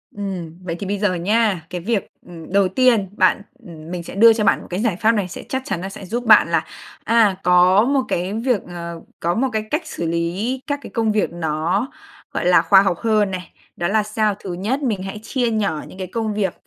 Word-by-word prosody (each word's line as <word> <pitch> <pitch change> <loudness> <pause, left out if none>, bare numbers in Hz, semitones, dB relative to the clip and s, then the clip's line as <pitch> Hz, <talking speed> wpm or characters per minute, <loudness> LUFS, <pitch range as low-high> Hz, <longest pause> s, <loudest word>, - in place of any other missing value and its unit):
Ừm, 185 -5 -5
vậy 170 -2 -4
thì 195 - -5
bây 205 +1 -1
giờ 205 -3 +1
nha, 200 -1 +1
cái 180 -1 -5
việc, 215 0 -2
ừm, 170 -2 -11
đầu 200 -1 +4
tiên 225 -2 +2
bạn, - - +3 0.2
ừm, 165 -1 -11
mình 175 -1 -4
sẽ - - -9
đưa 225 +3 +7
cho 220 -1 -1
bạn - - +3
một - - -12
cái 180 +2 -3
giải 225 -6 +1
pháp 220 +5 +3
này, 205 -5 -1
sẽ - - -8
chắc 260 0 -1
chắn 175 - -3
là 190 - -4
sẽ 195 0 -9
giúp 240 +6 -3
bạn 215 -6 +6
là, 165 -1 +1 0.4
à, 220 -4 +3
có 180 +3 +5
một 275 0 +2
cái 180 +3 -2
việc, 230 0 0
ờ, 170 -1 -7 0.2
có 170 +1 0
một 265 +4 +1
cái 215 - 0
cách 305 +3 +1
xử 170 - -4
lý 180 +10 -2
các 285 -1 -1
cái - - -8
công 225 -3 +1
việc 210 -4 0
nó, 170 - -1 0.5
gọi - - -2
là, 175 -2 +6
khoa 190 +3 +6
học 185 -4 0
hơn 215 -3 +1
này. 185 -2 -6 0.2
Đó 175 - -1
là 215 +2 +2
sao, 215 -1 0
thứ 185 -3 -6
nhất, 220 +11 -2
mình 210 -7 -1
hãy 195 +2 -6
chia 245 -1 -1
nhỏ 200 -8 -1
những 185 - -13
cái 185 - -5
công 220 +2 -2
việc 200 -4 -1
195 Hz, 240 wpm, -20 LUFS, 175-220 Hz, 0.5 s, đưa